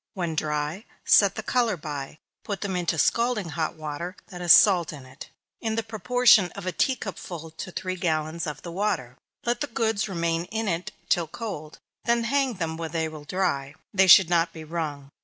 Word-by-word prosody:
When 175 -4 -2
dry, 150 +5 -2 0.2
set 200 -2 +5
the 220 - -5
color 235 -4 +1
by, 150 -2 -6 0.3
put 200 -2 -4
them 195 -3 -2
into 175 -2 0
scalding 230 +1 +1
hot 160 0 -2
water, 155 +4 -5
that 180 -1 -8
has 175 -1 +4
salt 180 -5 +7
in 140 -4 -10
it, 130 +1 -12 0.3
in 220 -2 -2
the 225 - -1
proportion 225 -3 +4
of 200 - -8
a 185 - -1
tea 265 +8 +1
cup 205 -6 -6
full 165 -2 -8
to 160 +4 -7
three 185 +1 -4
gallons 160 -2 -1
of 150 -1 -6
the 170 - -6
water. 170 -10 -2 0.3
Let 240 0 0
the 290 - 0
goods 220 -4 -1
remain 170 -2 -1
in 220 +3 -3
it 175 -1 -2 0.2
till 170 -3 +2
cold; 165 -6 -7 0.3
then 235 0 +2
hang 265 0 +1
them 160 -3 -3
where 165 -1 -4
they 160 0 -1
will 155 -2 -9
dry; 145 -5 -1 0.2
(they 190 -1 +4
should 185 0 +9
not 170 0 +2
be 160 - -9
wrung.) 150 -4 -5
175 Hz, 200 wpm, -26 LUFS, 160-210 Hz, 0.3 s, should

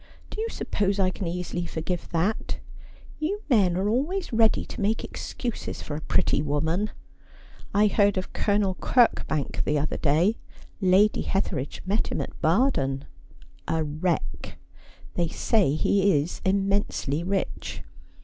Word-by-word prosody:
Do 430 - -4
you 455 - -1
suppose 200 - -1
I 185 -1 +3
can 185 - -4
easily 175 0 -3
forgive 165 +2 -3
that? 180 +6 -1 0.6
You 395 +8 -2
men 190 -7 +4
are 195 +2 0
always 295 - -1
ready 225 -1 +3
to 245 - -7
make 215 +2 +1
ex - - -7
cuses 240 -3 -4
for 145 - -5
a 155 - -5
pretty 145 - +2
woman. 160 +7 0 0.8
I 210 +1 +4
lieaid 205 -1 +3
of 185 - -3
Colonel 205 -2 +1
Kirkbank, 190 - +2
the 150 - +1
other 150 +1 -1
day. 165 +9 +2 0.4
Lady 195 +3 +4
Hetheridge 170 -8 -2
met 205 +4 0
him - - -2
at - - -6
Baden 155 - +2 0.3
— - - -25 0.3
a 160 -1 +1
wreck. 155 - -2 0.6
'They 170 -1 +1
say 180 -2 +2
he 195 0 +3
is 150 +5 -4
immensely 195 -6 0
rich. 190 +2 -3
190 Hz, 145 wpm, -26 LUFS, 160-210 Hz, 0.8 s, men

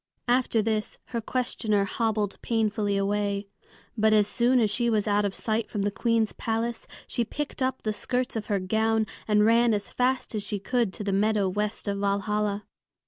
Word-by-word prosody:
After 240 -3 +2
this 215 -1 -1
her 235 -2 -2
questioner 220 -4 0
hobbled 215 -1 -1
painfully 215 -3 0
away. 200 0 0 0.5
But 220 -1 +3
as 210 -1 +4
soon 245 +4 +3
as 215 -3 +2
she 235 +3 +1
was 215 -2 +1
out 205 0 +2
of 195 - -2
sight 220 0 -1
from 205 - -2
the 205 - 0
Queen's 225 0 +1
palace, 230 +1 -2 0.2
she 240 - 0
picked 295 +4 -5
up 260 0 -1
the 215 - 0
skirts 250 +4 -1
of 220 -2 -3
her 205 - +1
gown 220 +3 +1 0.2
and 210 -1 +4
ran 230 0 +4
as 205 -1 -4
fast 255 0 0
as 215 - -1
she 205 +1 -2
could 235 +1 0
to - - -5
the 200 -1 -1
meadow 210 0 +2
west 210 +3 -2
of 200 0 -1
Valhalla. 205 +1 0
215 Hz, 190 wpm, -27 LUFS, 205-230 Hz, 0.5 s, as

